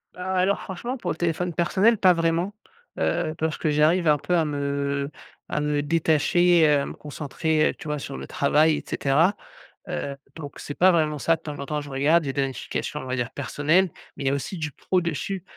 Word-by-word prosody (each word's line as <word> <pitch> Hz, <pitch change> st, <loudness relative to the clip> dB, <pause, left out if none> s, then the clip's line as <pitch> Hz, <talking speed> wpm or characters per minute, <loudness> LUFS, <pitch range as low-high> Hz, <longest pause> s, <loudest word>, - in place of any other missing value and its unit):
Ah 185 Hz, +1 st, -4 dB
alors 195 Hz, +2 st, +2 dB
franchement 235 Hz, +8 st, -5 dB
pour 180 Hz, -7 st, -3 dB
le 155 Hz, -, -4 dB
téléphone 175 Hz, +1 st, -1 dB
personnel 195 Hz, +7 st, +3 dB
pas 185 Hz, -2 st, +6 dB
vraiment, 165 Hz, +4 st, 0 dB, 0.5 s
heu, 155 Hz, -, 0 dB
parce 160 Hz, 0 st, -1 dB
que 155 Hz, -, 0 dB
j'arrive 155 Hz, +3 st, +3 dB
un 150 Hz, -1 st, +5 dB
peu 180 Hz, +5 st, -1 dB
à 165 Hz, -, +3 dB
me 140 Hz, -1 st, -2 dB, 0.4 s
à 150 Hz, -, -1 dB
me 150 Hz, 0 st, 0 dB
détacher, 165 Hz, +2 st, +3 dB
heu, 145 Hz, -1 st, +4 dB
à -, -, -2 dB
me -, -, -6 dB
concentrer, 155 Hz, +1 st, -1 dB
heu, -, -, -2 dB
tu -, -, -10 dB
vois, 150 Hz, -1 st, -2 dB
sur 135 Hz, -, -6 dB
le -, -, -7 dB
travail 150 Hz, +2 st, +3 dB
et -, -, -6 dB
cetera, 160 Hz, +9 st, +2 dB, 0.5 s
heu, 140 Hz, -1 st, -4 dB, 0.2 s
donc 145 Hz, -3 st, -8 dB
c'est 145 Hz, -, -6 dB
pas 185 Hz, +1 st, +5 dB
vraiment 155 Hz, -3 st, +1 dB
ça, 165 Hz, +3 st, +2 dB
de 160 Hz, -, -24 dB
temps 150 Hz, -2 st, -7 dB
en 140 Hz, -, -4 dB
temps, 150 Hz, +1 st, -2 dB
je 145 Hz, -, -9 dB
regarde 150 Hz, +5 st, +3 dB
j'ai 135 Hz, -, -3 dB
des 140 Hz, -1 st, +1 dB
notifications, 135 Hz, +2 st, -4 dB
on 130 Hz, -, -8 dB
va 130 Hz, 0 st, -2 dB
dire, 120 Hz, -1 st, -2 dB
personnelles, 155 Hz, +6 st, +1 dB, 0.3 s
mais 140 Hz, -, -6 dB
il -, -, -1 dB
y -, -, +3 dB
a 140 Hz, -, +1 dB
aussi 155 Hz, +6 st, -4 dB
du 150 Hz, -3 st, -3 dB
pro 185 Hz, +7 st, 0 dB
dessus 170 Hz, +3 st, -3 dB
155 Hz, 225 wpm, -24 LUFS, 145-175 Hz, 0.5 s, pas